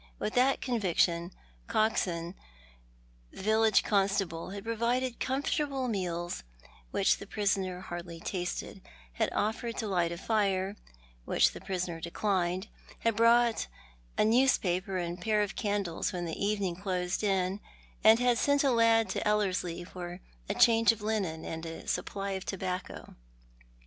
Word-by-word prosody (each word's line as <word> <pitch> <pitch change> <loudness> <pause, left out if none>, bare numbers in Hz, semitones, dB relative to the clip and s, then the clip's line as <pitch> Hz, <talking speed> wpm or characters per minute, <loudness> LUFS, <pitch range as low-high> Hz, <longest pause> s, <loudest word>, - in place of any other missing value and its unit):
With 215 - -3
that 260 +2 +3
conviction, 180 -7 +1 0.4
Coxon, 175 -6 0 1.0
the - - -9
village 220 -1 +4
constable, 195 -5 0
had 200 +1 -7
provided 235 +2 -1
com 265 +2 -1
fortable 275 -4 -1
meals 175 -5 -2 0.5
which - - +2
the - - -9
prisoner 195 -3 -1
hardly 175 -2 -7
tasted, 180 +2 -4 0.3
had - - 0
offered 225 +2 -1
to - - -2
light 175 -4 +1
a 170 - -4
fire, 195 -2 0 0.5
which - - +3
the - - -10
prisoner 180 -3 -3
declined, 185 +1 -1 0.3
had 230 -1 +1
brought 230 +1 +4 0.5
a - - +4
news 250 +5 +5
paper 185 +1 -1
and 175 0 -3
a - - -15
pair 210 +1 +2
of 205 - -4
caudles 200 -6 -1
when 175 -2 -3
evening 200 +1 -1
closed 180 0 -2
in, 190 -1 +1 0.4
and 220 +1 +8
had 245 -1 +2
sent 285 0 +3
a 275 - +3
lad 230 -1 +4
to - - -2
EUerslie 185 -4 0
for 175 -1 -7 0.3
a - - 0
change 230 0 +6
of 220 -2 -7
linen 195 -7 -1
and 160 0 -5
a 165 0 -7
supply 200 0 -2
of 190 -1 -3
tobacco. 185 -2 -5
195 Hz, 145 wpm, -30 LUFS, 180-225 Hz, 1.0 s, and